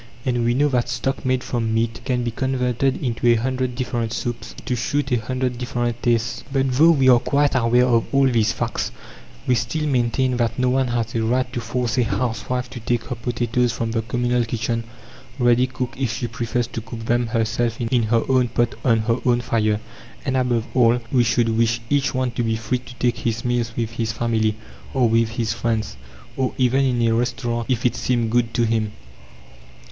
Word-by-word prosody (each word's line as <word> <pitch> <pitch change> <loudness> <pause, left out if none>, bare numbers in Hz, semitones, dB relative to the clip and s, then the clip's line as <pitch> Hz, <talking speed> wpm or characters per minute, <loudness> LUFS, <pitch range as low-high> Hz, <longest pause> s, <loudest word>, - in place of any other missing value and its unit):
And 120 -2 +1
we 120 +1 +2
know 145 +3 +3
that 125 -2 0
stock 135 +2 -2
made 130 -1 0
from 115 -2 -1
meat 115 0 -1
can 125 -2 0
be 120 - -1
converted 130 +1 0
into 120 -1 -1
a 120 - +6
hundred 130 +1 -1
different 120 -3 -2
soups 120 -1 -4
to 125 - 0
suit 140 +3 -1
a 120 -2 +2
hundred 125 +1 -2
different 120 -1 -2
tastes. 115 -1 0
But 135 -1 +1
though 150 +6 +5
we 135 -6 +4
are 125 -2 +7
quite 145 +3 +1
aware 125 -1 +3
of 115 -2 +2
all 135 0 +4
these 115 -3 +2
facts, 120 0 -2 0.5
we 125 - +3
still 125 +7 -1
maintain 125 -1 +1
that 120 -2 0
no 125 0 +2
one 130 0 +2
has 115 -2 -2
a 115 - 0
right 125 +2 0
to 120 - -2
force 120 +1 -1
a - - +4
housewife 125 +1 -2
to 125 - -7
take 120 +1 -1
her 125 - -5
potatoes 120 0 0
from 115 -1 -2
the 115 0 0
communal 120 +2 0
kitchen 115 0 -2 0.5
ready 120 0 +3
cooked 125 -1 -5
if 130 -4 0
she 120 +1 -3
prefers 120 +1 -2
to 115 - -5
cook 115 -1 -8
them 120 +1 +1
herself 115 0 0
in 120 +1 +1
her 115 +1 +2
own 130 -2 +3
pot 120 0 0
on 115 -3 +3
her 115 +2 0
own 120 -1 +3
fire. 110 -3 0 0.5
And, 130 -2 0
above 125 -3 +1
all, 120 -1 +4
we 125 -3 +4
should 115 0 +2
wish 115 +1 +2
each 140 -1 +1
one 130 -1 0
to 120 - -2
be 115 -1 0
free 110 +3 -2
to 125 0 -13
take 120 0 0
his 115 0 -2
meals 120 -1 -1
with 115 -1 -1
his 115 -1 -2
family, 110 -2 0 0.4
or 125 -2 +4
with 115 0 +2
his 115 -2 0
friends, 115 - -2 0.4
or 130 -1 -1
even 130 +1 +3
in 120 -2 +1
a 115 - +2
restaurant, 120 0 -1
if 125 -2 0
it 120 -1 +2
seemed 115 -1 0
good 120 -1 +2
to 120 - +2
him. 110 -2 0
120 Hz, 205 wpm, -22 LUFS, 115-125 Hz, 0.5 s, are